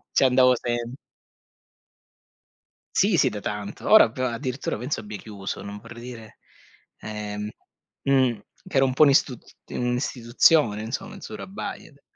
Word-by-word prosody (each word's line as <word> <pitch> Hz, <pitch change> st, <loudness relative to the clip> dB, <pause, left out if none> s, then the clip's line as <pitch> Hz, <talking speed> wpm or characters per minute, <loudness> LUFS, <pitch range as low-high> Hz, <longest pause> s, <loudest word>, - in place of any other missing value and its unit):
Ci -, -, +4 dB
andavo 130 Hz, 0 st, +5 dB
sem 120 Hz, 0 st, -3 dB, 2.0 s
Sì -, -, +4 dB
sì -, -, +4 dB
da 105 Hz, -, -6 dB
tanto. 105 Hz, 0 st, -5 dB
Ora 220 Hz, -, +9 dB
p -, -, -14 dB
addirittura 125 Hz, 0 st, -2 dB
penso 130 Hz, +6 st, -3 dB
abbia 105 Hz, 0 st, -7 dB
chiuso, 100 Hz, -2 st, -6 dB
non 100 Hz, 0 st, -7 dB
vorrei 115 Hz, +2 st, -11 dB
dire 120 Hz, -3 st, -10 dB, 0.6 s
ehm 105 Hz, -1 st, -5 dB, 0.5 s
mhmm, 130 Hz, -5 st, +2 dB, 0.3 s
che 185 Hz, -, -5 dB
ero 135 Hz, -, +6 dB
un 130 Hz, -, -1 dB
po' 155 Hz, -, +6 dB
ist 135 Hz, -2 st, +3 dB, 0.3 s
un'istituzione 125 Hz, -1 st, +2 dB
insomma 195 Hz, -, -5 dB
il 195 Hz, -, -13 dB
Surabaya 200 Hz, -1 st, -7 dB
de 140 Hz, -1 st, -24 dB
120 Hz, 140 wpm, -25 LUFS, 105-135 Hz, 2.0 s, Ora